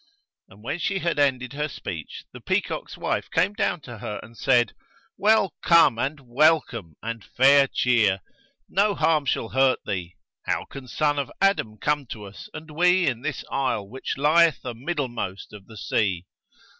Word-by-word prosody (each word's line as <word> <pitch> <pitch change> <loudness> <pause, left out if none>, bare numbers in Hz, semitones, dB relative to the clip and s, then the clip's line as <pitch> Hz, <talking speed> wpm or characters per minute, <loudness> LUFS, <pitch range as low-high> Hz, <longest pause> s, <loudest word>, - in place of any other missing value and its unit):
And 100 +2 -17
when 145 +8 -3
she 200 +2 -1
had 170 -5 -1
ended 130 -2 +1
her 150 +1 -2
speech 85 - -7
the - - -10
peacock's - - -2
wife - - -2
came 180 +5 +1
down 205 -6 -1
to 120 -5 -10
her 105 -2 -5
and 115 - -14
said, 120 -1 +2 0.4
"Well 205 -3 +3
come 165 -9 +5
and 140 +3 -2
welcome 125 - +1
and 115 -1 -5
fair 135 +4 +5
cheer! 110 -8 +2 0.5
No 200 +1 +2
harm 155 -3 +2
shall 115 - -1
hurt 130 0 +3
thee: 90 -4 -4 0.3
how - - -1
can 135 -2 -10
son 145 +2 0
of 140 - -3
Adam 195 - +1
come 145 +2 -1
to 110 -2 -8
us 100 0 -11
and 155 0 -9
we 180 +3 +3
in 120 -5 -1
this 150 0 -4
isle 125 -7 -1
which 130 +6 -5
lieth 160 +3 +4
amiddlemost 120 - -4
of 100 -2 -12
the 110 - -12
sea? 95 -6 -1
135 Hz, 170 wpm, -24 LUFS, 115-155 Hz, 0.5 s, come